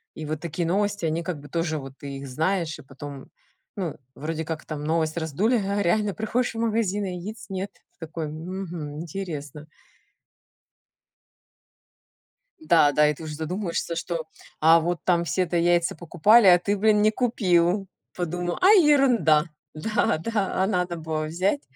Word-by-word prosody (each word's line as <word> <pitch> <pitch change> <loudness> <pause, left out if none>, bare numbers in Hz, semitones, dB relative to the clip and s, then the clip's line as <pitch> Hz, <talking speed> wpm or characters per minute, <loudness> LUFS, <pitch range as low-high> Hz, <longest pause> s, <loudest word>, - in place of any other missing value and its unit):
И 155 - -6
вот 155 0 -3
такие 170 +1 -3
новости, 205 +1 0
они 165 +1 -1
как 170 -4 -4
бы 145 0 -13
тоже 165 -1 -1
вот 135 -1 -9
ты 140 -1 -7
их 140 0 -8
знаешь, 160 +4 -1
и - - -12
потом, 140 0 -9 0.5
ну, 175 -7 -3 0.2
вроде 160 +2 -4
как 160 0 -5
там 150 -2 -5
новость 160 +1 0
раздули, 170 - +1
а 200 -1 -1
реально 200 +3 +1
приходишь 230 +3 -1
в 225 - -4
магазин, 215 -3 0
а - - -3
яиц 185 +5 -7
нет. 195 +1 -3 0.3
Ты 165 - -7
такой: 160 0 -4
"Мгм, 165 -1 -6
интересно". 155 -4 -6 2.9
Да, 165 - +4
да, 150 +1 +4
и - - +1
ты 160 - -11
уже 150 -1 -6
задумываешься, 170 +1 -3
что, 165 -1 -3 0.3
а 165 +2 +6
вот 170 0 -2
там 170 -2 +2
все-то 175 0 0
яйца 170 0 +2
покупали, 185 +7 +4
а 175 -1 +8
ты, 205 +3 -1
блин, 210 +1 +4
не 215 +1 +4
купил. 195 -5 +1 0.3
Подумал: 175 0 -2
"А, 370 - +6
ерунда". 255 - +5 0.3
Да, 155 0 0
да, 195 +1 -1
а - - +2
надо 180 -4 -1
было 155 -1 -3
взять, 185 - 0
170 Hz, 165 wpm, -25 LUFS, 155-200 Hz, 2.9 s, а